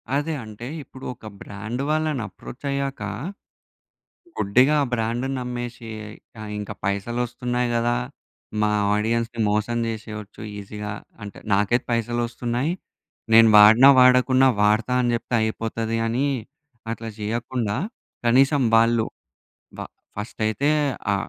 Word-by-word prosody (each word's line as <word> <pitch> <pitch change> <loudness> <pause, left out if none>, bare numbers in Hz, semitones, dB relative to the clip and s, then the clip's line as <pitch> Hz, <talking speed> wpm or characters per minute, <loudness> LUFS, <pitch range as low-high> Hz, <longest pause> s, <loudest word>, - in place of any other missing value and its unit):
అదే. 150 +3 0
అంటే 110 +3 -9 0.2
ఇప్పుడు 130 0 -12
ఒక 110 - -12
బ్రాండ్ 110 +6 -5
వాళ్ళని 155 -4 0
అప్రోచ్ 120 +7 -11
అయ్యాక, 140 -4 -3 1.4
గుడ్డిగా 125 +9 +4
ఆ - - 0
బ్రాండ్‌ని 120 +3 -1
నమ్మేసి, 120 -1 -5 0.7
ఇంకా 105 - -5
పైసలు 100 +4 -1
వస్తున్నాయి 125 0 -2
కదా! 120 +1 +1 0.7
మా 105 - +3 0.2
ఆడియన్స్‌ని 115 +2 -1
మోసం 105 +3 0
చేసేయోచ్చు 110 -2 -7 0.2
ఈజీగా, 105 +1 -6 0.3
అంటే 100 - -8
నాకైతే 105 +5 +2
పైసలు 120 +1 0
వస్తున్నాయి. 120 +6 -2 0.6
నేను 115 0 +8
వాడినా 110 +6 +8
వాడకున్నా 130 +1 +6
వాడతా 110 +4 +2
అని 120 -1 +1
చెప్తే 120 +1 -3
అయిపోతది 115 +1 -2
అని 125 +5 0 0.7
అట్లా 115 0 -6
చేయకుండా, 115 0 -2 0.5
కనీసం 135 +4 +4
వాళ్ళు 115 0 +4 0.7
వ - - -8 0.4
ఫస్ట్ 105 +1 -7
అయితే, 135 +8 0 0.4
ఆ! - - +2
115 Hz, 115 wpm, -23 LUFS, 110-125 Hz, 1.4 s, నేను